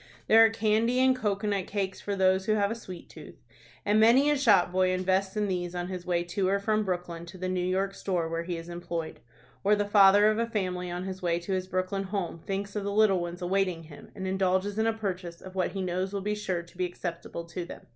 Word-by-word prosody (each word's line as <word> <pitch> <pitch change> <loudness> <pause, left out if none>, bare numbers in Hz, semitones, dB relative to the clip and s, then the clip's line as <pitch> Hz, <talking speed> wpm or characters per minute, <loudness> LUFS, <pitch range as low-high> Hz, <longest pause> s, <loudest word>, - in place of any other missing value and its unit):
There 225 +1 +7
are 225 - +6
candy 225 +2 +1
and 260 0 +4
cocoanut 205 -4 -1
cakes 195 -2 -3
for 205 - -3
those 190 0 +2
who 215 - +3
have 205 -1 +1
a - - -2
sweet 185 -6 -10
tooth, - - -12 0.5
and 210 +1 +3
many 250 +7 +5
a - - +3
shop 210 -11 +4
boy 185 0 +2
invests 190 +2 0
in 210 -1 +1
these 180 -2 -3
on 175 0 -3
his 180 -2 -6
way 175 -1 +1
to 185 +2 -1
or 200 - +2
from 215 +1 0
Brooklyn 175 -3 -4
to 170 - -10
the 185 0 -3
New 185 -1 -1
York 190 +2 0
store 180 -4 -2
where 165 0 -2
he 170 0 -4
is 165 0 -8
employed; 170 -2 -5 0.4
or 205 +2 +4
the 205 0 0
father 205 0 +6
of 215 - -1
a 230 - 0
family, 185 -5 -2
on 175 +1 -4
his 190 0 -6
way 170 -2 +1
to 190 +3 -3
his 185 0 -2
Brooklyn 185 +1 -2
home, 190 -4 -3
thinks 200 +3 -4
of 210 - -2
the 200 - -2
little 205 -2 +4
ones 175 +1 -5
awaiting 180 -2 0
him, 155 -2 -13
and 190 -2 -5
indulges 190 +2 0
in 220 - +2
a - - +3
purchase 185 -6 -5
of 185 - -11
what 185 -1 -1
he 195 -1 -3
knows 185 +2 -2
will 200 - -2
be 210 +2 -1
sure 185 -5 -2
to 170 +1 -19
be 180 - +2
acceptable 170 -1 -6
to 175 +1 -5
them. 170 - -9
190 Hz, 245 wpm, -28 LUFS, 180-205 Hz, 0.5 s, There